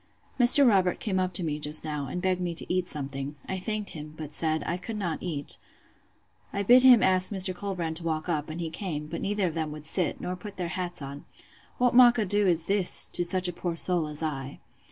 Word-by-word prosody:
Mr. 255 +3 +7
Robert 190 -5 +2
came 190 -4 -2
up 185 0 -1
to 185 - -2
me, 150 -2 -3
just 150 +1 +4
now, 150 -3 -4
and 180 +8 -6
begged 185 -1 0
me 175 -1 -3
to - - -4
eat 185 -1 -1
something: 140 -1 -4
I 190 - -4
thanked 215 +1 -4
him; 150 0 -9
but 155 -2 -8
said, 160 -1 +1
I 170 - -2
could 215 +5 -7
not 175 -6 -4
eat. 155 -6 -3 0.9
I 200 - -3
bid 245 +5 +6
him 250 -3 +6
ask 185 +1 +4
Mr. 190 -2 +3
Colbrand 175 -4 -4
to 170 - -9
walk 160 -1 -3
up; 155 -3 -2
and 155 +2 -7
he 165 -2 -4
came; 160 -5 -5
but 160 +2 -7
neither 205 -1 -1
of 170 - -2
them 160 -2 -4
would 150 0 -11
sit; 175 +1 -1
nor 180 - -5
put 200 +2 -10
their 175 -2 -4
hats 175 -4 -4
on. 140 +1 -9 0.5
What 245 -1 +1
mockado 220 -5 +4
is 170 -2 +1
this, 195 0 +3
to 175 - +2
such 180 +1 +1
a 180 - -4
poor 175 0 -4
soul 170 -2 +1
as 150 +1 -6
I! 135 -3 -5
175 Hz, 230 wpm, -26 LUFS, 155-195 Hz, 0.9 s, Mr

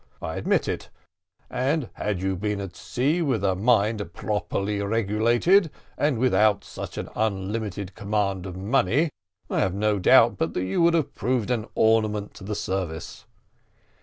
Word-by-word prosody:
I - - -5
admit - - +1
it; - - -4 0.6
and 135 +1 -1
had 100 -3 -3
you 95 0 0
been 105 +2 -2
sent 95 -3 -6
to - - -15
sea 145 +8 0
with 130 - 0
a 95 -2 +3
mind 105 -2 +1
properly 105 -1 -2
regulated, 115 - +3 0.3
and 145 -4 +1
without 110 -4 +3
such - - -8
an - - -4
unlimited 100 -2 -2
command 100 -2 -1
of 90 -1 -7
money, 120 - +1 0.4
I - - -1
have 95 -1 +1
no 105 0 +1
doubt 90 - +5
but - - -1
that 90 - 0
you 95 - 0
would 170 0 +4
have 160 -4 0
proved 120 +2 -1
an 115 -2 -1
ornament 110 -2 +2
to - - -12
the 105 +2 -3
service. 90 -5 -4
105 Hz, 165 wpm, -25 LUFS, 95-120 Hz, 0.6 s, doubt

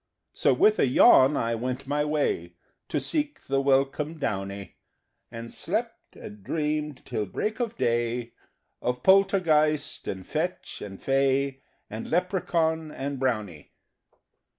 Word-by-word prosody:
So - - +2
with 215 0 +4
a - - +4
yawn 130 +2 +6
I 115 0 0
went 125 +3 -3
my 145 +2 0
way 145 - -1 0.3
To - - 0
seek 295 -1 -2
the 135 0 +1
welcome 140 +3 +1
downy, 100 - -4 0.5
And 115 0 -8
slept, - - -4
and 105 -1 -11
dreamed 150 0 -2
till 105 -2 -3
break 215 - -3
of 235 -1 -2
day 120 0 -1 0.5
Of 125 0 -2
Poltergeist 170 -6 +3
and 95 -1 -5
Fetch 170 +4 -3
and 95 -2 -8
Fay 135 0 +1 0.3
And 110 +2 -7
Leprechaun 165 -3 0
and 140 -1 -4
Brownie! 105 - -2
135 Hz, 130 wpm, -26 LUFS, 115-155 Hz, 0.5 s, yawn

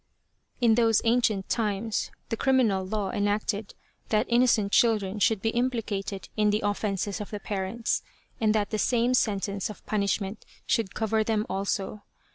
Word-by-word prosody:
In 235 -2 +4
those 225 -2 +3
ancient 225 -4 +2
times 215 -1 -1 0.2
the - - 0
criminal 230 -7 +2
law 195 0 -2
enacted 205 -1 -1 0.3
that 215 +2 +2
innocent 235 -4 +3
children 210 -4 +2
should 205 0 +2
be 225 - +2
implicated 220 -6 -2
in 210 -1 +3
the 210 +1 0
offences 205 0 -1
of 205 - -6
the 210 - -5
parents, 200 +3 -2 0.4
and 220 -2 +2
that 210 -1 0
the 215 - -1
same 240 +3 +2
sentence 200 -4 0
of 210 - -10
punishment 200 0 -1 0.2
should 220 -5 0
cover 220 0 +1
them 215 -1 0
also. 195 +1 -2
215 Hz, 150 wpm, -27 LUFS, 200-225 Hz, 0.4 s, In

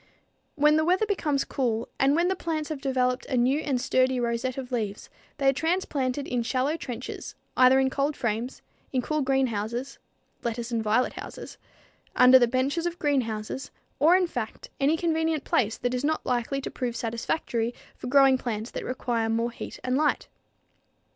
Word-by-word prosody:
When 300 +1 +4
the 315 - +3
weather 365 +6 +2
becomes 305 -9 0
cool 235 -4 -1
and 275 +2 +4
when 340 +2 +3
the 380 - +1
plants 320 -3 -3
have 300 -3 -4
developed 255 -2 0
a 255 - -1
new 255 +4 +3
and 275 -5 -1
sturdy 255 0 +2
rosette 240 +2 -1
of 260 -1 -6
leaves, 215 -4 -3 0.3
they 275 - +1
are 270 - +6
transplanted 285 -4 -1
in 245 -1 0
shallow 255 +6 0
trenches 250 -6 -6 0.2
either 255 +1 +6
in 265 0 +2
cold 280 +2 -1
frames, 235 +2 -3 0.3
in 255 -2 0
cool 305 +2 -1
greenhouses 255 -1 -1 0.4
(lettuce 235 0 -3
and 230 -1 0
violet 220 +4 +1
houses), - - -9 0.6
under 255 +1 +8
the 240 - +4
benches 270 +8 0
of 345 0 -4
greenhouses, 255 -5 -1 0.3
or, 320 +6 +6
in 370 -1 +3
fact, 245 -9 -6
any 285 +4 +3
convenient 320 -2 0
place 220 -1 +1
that 245 0 -2
is 250 +1 -2
not 310 +2 0
likely 250 +3 -1
to - - -5
prove 245 -2 -3
satisfactory 230 0 -2 0.2
for - - -8
growing 270 0 +5
plants 225 -2 -4
that - - -5
require 235 -3 -1
more 230 +1 0
heat - - -8
and 255 0 0
light. 300 0 +1
260 Hz, 175 wpm, -27 LUFS, 240-290 Hz, 0.6 s, under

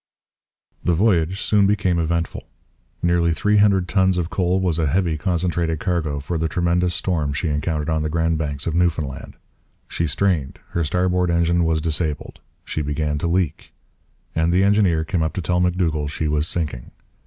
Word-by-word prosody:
The 85 - +2
voyage 95 -2 +2
soon 100 -2 +3
became 95 -4 +1
eventful. 85 +1 -2 0.6
Nearly 85 -1 +2
three 105 +4 +2
hundred 100 -3 +3
tons 95 0 +2
of 85 -1 -2
coal 90 0 +1
was 90 -3 0
a 80 - +1
heavy 85 +1 +1
concentrated 85 -1 -1
cargo 80 -5 -1
for 80 +4 -3
the 80 - 0
tremendous 85 +2 0
storm 80 -6 -1
she 80 +4 -2
encountered 75 +1 -1
on 80 -1 0
the 75 - -1
Grand 80 0 0
Banks 70 -2 -3
of 85 - -1
Newfoundland. 80 -5 -1 0.5
She 85 - -1
strained; 75 -3 0
her 85 - -1
starboard 90 +2 +1
engine 85 0 +2
was 80 -1 +1
disabled; 80 -1 -2 0.3
she 80 - -3
began 75 0 -2
to 85 - -1
leak; 85 -2 -1 0.6
and 80 +1 +1
the 90 +2 +3
engineer 100 -6 +3
came 90 0 -1
up 80 - -1
to 95 - -3
tell 90 +2 +1
M'Dougall 85 -4 0
she 75 +1 -2
was 75 +1 +1
sinking. 75 -10 -3
85 Hz, 175 wpm, -21 LUFS, 80-90 Hz, 0.6 s, soon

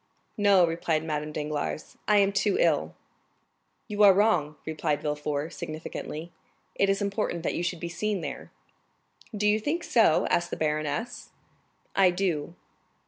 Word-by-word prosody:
"No," 200 -3 +5
replied 165 -1 -1
Madame 150 -1 -3
Danglars, 150 0 -4
"I 210 - +5
am 200 -1 +4
too 200 0 +1
ill." 150 - +2 0.9
"You 210 0 -2
are 200 -2 +8
wrong," 190 -8 +2
replied 155 -1 -2
Villefort, 150 +1 -2
significantly; 155 +1 -6 0.4
"it 200 - +1
is 195 +1 +1
important 200 -4 -2
that - - -1
you - - -2
should 175 0 -2
be 170 - -4
seen 200 +3 -2
there." - - -6 0.9
"Do 210 +1 +1
you 210 +1 +3
think 315 +10 -2
so?" 225 -10 +4
asked 175 0 +1
the - - -4
baroness. 155 +10 -2 0.7
"I 195 -2 +6
do." 175 -3 -2
175 Hz, 145 wpm, -27 LUFS, 155-205 Hz, 0.9 s, are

